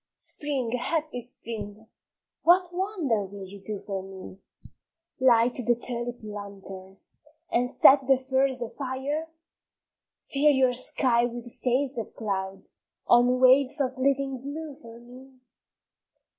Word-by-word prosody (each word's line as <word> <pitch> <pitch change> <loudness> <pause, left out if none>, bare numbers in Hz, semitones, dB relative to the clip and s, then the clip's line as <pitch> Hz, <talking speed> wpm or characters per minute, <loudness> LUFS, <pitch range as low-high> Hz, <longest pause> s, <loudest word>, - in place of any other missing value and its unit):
Spring, 265 -5 -2
happy 305 -1 -2
Spring, 220 -3 -6 0.6
what 355 +1 +4
wonder 350 - -1
will 195 0 -8
you 195 +1 -10
do 210 0 -2
for 195 -2 -3
me? 190 0 -11 0.8
Light 245 -2 +4
the 245 -1 +1
tulip 240 0 -2
lanterns, 195 -2 -8 0.3
and 245 +1 +1
set 270 +1 +6
the 270 -1 +5
furze 260 -1 0
a 230 - -6
fire? 280 +5 -4 0.9
Fill 290 +1 +2
your 260 -2 +3
sky 245 -1 +2
with 240 0 -5
sails 250 +2 -1
of 225 - -7
cloud 195 -2 -3 0.4
on 245 +1 +4
waves 260 +3 +5
of 260 -1 -1
living 270 0 +1
blue 290 +2 -6
for 230 -2 -12
me? 255 +2 -15
250 Hz, 125 wpm, -27 LUFS, 225-275 Hz, 0.9 s, set